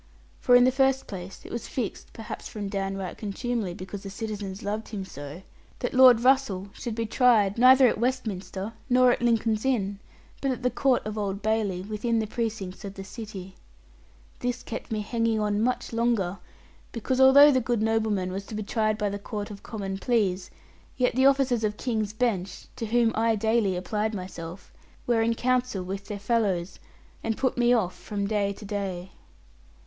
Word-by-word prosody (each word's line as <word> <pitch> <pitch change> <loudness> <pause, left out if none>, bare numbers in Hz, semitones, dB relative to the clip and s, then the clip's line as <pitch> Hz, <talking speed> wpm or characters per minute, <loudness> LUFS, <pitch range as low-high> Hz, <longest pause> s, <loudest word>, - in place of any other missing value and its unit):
For 245 - +5
in 245 - +7
the 255 - +5
first 265 0 +2
place 190 -1 -8
it - - -9
was 235 - -4
fixed 235 -7 -4
(perhaps 220 -1 -7
from 205 -2 -5
down 195 -1 -2
right 185 -3 -5
contumely, 215 -2 -3
because 190 +2 -7
the 195 - -7
citizens 200 -2 -5
loved 210 +2 -3
him 200 -3 -5
so) 145 +2 -9 0.3
that 245 - -3
Lord 255 -2 +8
Russell 245 -7 +2
should 235 -3 -5
be 230 0 -1
tried 220 -3 +3
neither 260 +1 +8
at 225 - 0
Westminster 215 -5 -2 0.2
nor 250 0 +5
at - - -1
Lincoln's 225 -2 +1
Inn, 205 -7 0 0.4
but 275 - 0
at 255 -1 -3
the 250 - +2
Court 265 -5 +1
of 215 0 -4
Old 200 -1 -3
Bailey, 210 -4 0
within 215 +3 -1
the 220 - +1
precincts 215 -4 -4
of 200 -1 -7
the 195 - -7
city. 195 -3 -8 0.9
This 245 0 -2
kept 225 - -7
me 215 -1 -1
hanging 230 +1 0
on 210 0 0
much 250 0 -1
longer; 225 -6 0 0.5
because 255 +3 -1
although 280 +3 +9
the 260 -2 +2
good 235 -2 0
nobleman 220 -4 0
was 195 +1 -5
to 220 - -7
be 215 - -3
tried 215 0 0
by 210 -1 0
the 200 +1 -4
Court 205 +1 -5
of 200 - -9
Common 195 -4 -5
Pleas, 195 -6 0 0.5
yet 250 -1 +2
the 260 +1 +5
officers 270 -4 +2
of 210 -1 -1
King's 220 -5 -1
Bench, 215 -5 -2
to 225 - -4
whom 230 0 +3
I 225 0 +2
daily 220 -2 +1
applied 210 +4 -2
myself, 180 -1 -8 0.3
were 235 -2 +2
in 230 +1 +1
counsel 250 -5 0
with 195 +2 -5
their 210 - -4
fellows, 200 -4 0 0.4
and 225 -1 -1
put 260 - 0
me 240 0 +3
off 215 -7 +2
from 200 -1 -4
day 200 -1 0
to 205 +1 -9
day. 190 -3 -4
215 Hz, 185 wpm, -26 LUFS, 195-240 Hz, 0.9 s, although